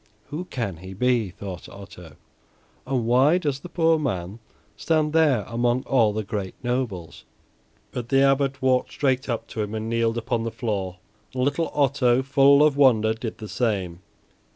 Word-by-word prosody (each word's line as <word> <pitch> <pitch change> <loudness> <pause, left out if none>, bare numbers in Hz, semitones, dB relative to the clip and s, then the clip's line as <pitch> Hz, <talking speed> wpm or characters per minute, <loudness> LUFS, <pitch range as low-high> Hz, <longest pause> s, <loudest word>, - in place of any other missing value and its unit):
"Who 165 +5 -4
can 115 - -4
he 95 +2 -10
be," 120 -1 +1
thought 95 -1 -8
Otto, 90 -6 -12 0.7
"and 130 -4 -1
why 130 +8 +4
does 145 -6 -2
the 175 - -10
poor 165 -2 +2
man 100 -7 -3 0.4
stand 155 -2 0
there 150 -9 +3
among 120 +2 0
all 115 -7 +3
the 110 +1 -3
great 100 -2 -5
nobles?" 120 -9 -3 0.7
But 120 -1 -5
the 135 0 +4
Abbot 135 0 +1
walked 130 -1 +2
straight 135 -1 0
up 115 - -2
to 110 - -4
him 105 +1 -4
and 110 0 -4
kneeled 115 0 0
upon 115 0 -1
the 115 - -2
floor, 100 -6 -3 0.4
and 125 - 0
little 145 +5 0
Otto, 135 -3 +2
full 140 +1 +5
of 150 -2 +3
wonder, 115 -6 +4
did 110 0 -6
the 110 - -8
same. 95 -8 -2
120 Hz, 170 wpm, -24 LUFS, 105-135 Hz, 0.7 s, full